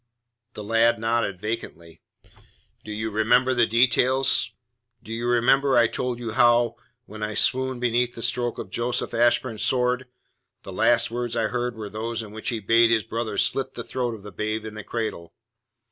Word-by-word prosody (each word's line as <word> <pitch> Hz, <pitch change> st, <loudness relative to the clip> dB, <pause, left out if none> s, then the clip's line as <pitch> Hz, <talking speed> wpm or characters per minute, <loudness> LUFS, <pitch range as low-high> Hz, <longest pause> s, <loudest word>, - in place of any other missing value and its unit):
The 105 Hz, -, -8 dB
lad 115 Hz, +2 st, +3 dB
nodded 115 Hz, -4 st, -1 dB
vacantly. 85 Hz, -6 st, -6 dB, 0.8 s
"Do 110 Hz, -, -8 dB
you 110 Hz, +1 st, -3 dB
remember 120 Hz, +5 st, +3 dB
the 120 Hz, -2 st, +3 dB
details? 125 Hz, +3 st, +3 dB, 0.5 s
Do 110 Hz, -, -7 dB
you 120 Hz, +1 st, -3 dB
remember 130 Hz, +3 st, +3 dB
I 120 Hz, -, +6 dB
told 125 Hz, +1 st, -2 dB
you 120 Hz, -2 st, -5 dB
how, 120 Hz, 0 st, +3 dB, 0.3 s
when 110 Hz, 0 st, -11 dB
I 105 Hz, 0 st, -3 dB
swooned 130 Hz, -1 st, +1 dB
beneath 120 Hz, 0 st, 0 dB
the 115 Hz, -, -5 dB
stroke 120 Hz, 0 st, -1 dB
of 95 Hz, -, -7 dB
Joseph 120 Hz, +3 st, -2 dB
Ashburn's 120 Hz, -1 st, +1 dB
sword, 125 Hz, +1 st, +1 dB, 0.6 s
the -, -, -9 dB
last 115 Hz, -1 st, +3 dB
words 120 Hz, 0 st, -3 dB
I 110 Hz, -2 st, 0 dB
heard 125 Hz, -1 st, -2 dB
were 110 Hz, -2 st, -6 dB
those 110 Hz, +2 st, -4 dB
in 105 Hz, -, -11 dB
which 110 Hz, +1 st, -4 dB
he 115 Hz, -3 st, -2 dB
bade 115 Hz, +3 st, +4 dB
his 115 Hz, -2 st, +2 dB
brother 110 Hz, -2 st, -4 dB
slit 135 Hz, +4 st, 0 dB
the 120 Hz, -, -5 dB
throat 120 Hz, 0 st, -3 dB
of 105 Hz, -, -13 dB
the 105 Hz, -, -9 dB
babe 110 Hz, +1 st, -3 dB
in 110 Hz, -, -7 dB
the 110 Hz, 0 st, -8 dB
cradle? 110 Hz, -7 st, -5 dB
115 Hz, 180 wpm, -24 LUFS, 110-120 Hz, 0.8 s, I